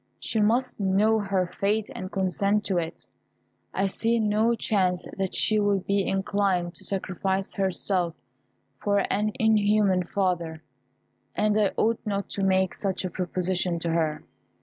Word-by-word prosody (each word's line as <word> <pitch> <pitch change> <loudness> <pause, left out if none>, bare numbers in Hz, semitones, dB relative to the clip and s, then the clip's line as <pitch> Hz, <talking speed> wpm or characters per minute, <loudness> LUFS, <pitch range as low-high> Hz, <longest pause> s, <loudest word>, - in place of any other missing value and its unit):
She 225 - -2
must 235 +4 +1
know 205 +3 +3
her 195 -3 -1
fate 210 +2 0
and 185 +1 -6
consent 200 +2 0
to 185 -3 +1
it. 165 -1 -6 0.7
I 195 - 0
see 225 +4 0
no 220 +2 +2
chance 185 -5 0
that 190 -2 -2
she 215 -1 +3
will 205 -1 +2
be 200 +1 0
inclined 195 -2 0
to - - -11
sacrifice 190 0 -2
herself 185 -2 0 0.6
for 200 -1 +1
an 210 +1 0
inhuman 210 -4 +3
father, 170 -5 -1 0.7
and 210 0 +2
I 210 -2 +3
ought 225 +1 +2
not 200 -2 -3
to 200 - -4
make 190 -1 +2
such 195 -2 -2
a 185 - -3
proposition 180 0 0
to 165 0 -2
her. 160 -2 0
195 Hz, 150 wpm, -26 LUFS, 185-210 Hz, 0.7 s, know